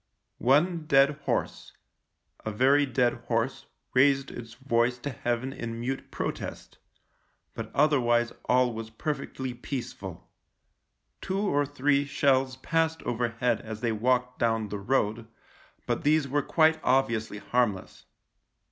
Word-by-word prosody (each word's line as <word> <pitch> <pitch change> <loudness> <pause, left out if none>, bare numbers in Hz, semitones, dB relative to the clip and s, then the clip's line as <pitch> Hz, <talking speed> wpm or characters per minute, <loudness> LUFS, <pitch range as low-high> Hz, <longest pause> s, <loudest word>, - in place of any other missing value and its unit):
One 155 +6 +2
dead 135 0 +5
horse - - -2 0.3
— - - -51
a - - -3
very 135 +6 +3
dead 125 -2 +2
horse - - -1
— - - -50
raised 135 +1 +3
its 115 -1 -9
voice 125 -1 +1
to 140 +4 -5
heaven 120 +2 -2
in 115 -3 -5
mute 130 +3 -4
protest; - - -5 0.7
but - - -6
otherwise 120 -5 +3
all 125 -1 +3
was 110 0 -6
perfectly 130 +1 -4
peaceful. 125 +1 -6 0.9
Two 195 +1 -2
or 145 -8 +1
three 145 0 +1
shells 135 -2 +2
passed 160 +3 0
overhead 120 +1 0
as 110 -1 -7
they 120 -2 +1
walked 125 +3 0
down 115 -2 +1
the 105 +1 -4
road, 110 0 0 0.6
but - - -1
these 150 -1 +3
were 145 +2 +1
quite 160 +2 +3
obviously 115 -5 +1
harmless. 105 -4 -1
130 Hz, 130 wpm, -28 LUFS, 115-140 Hz, 0.9 s, dead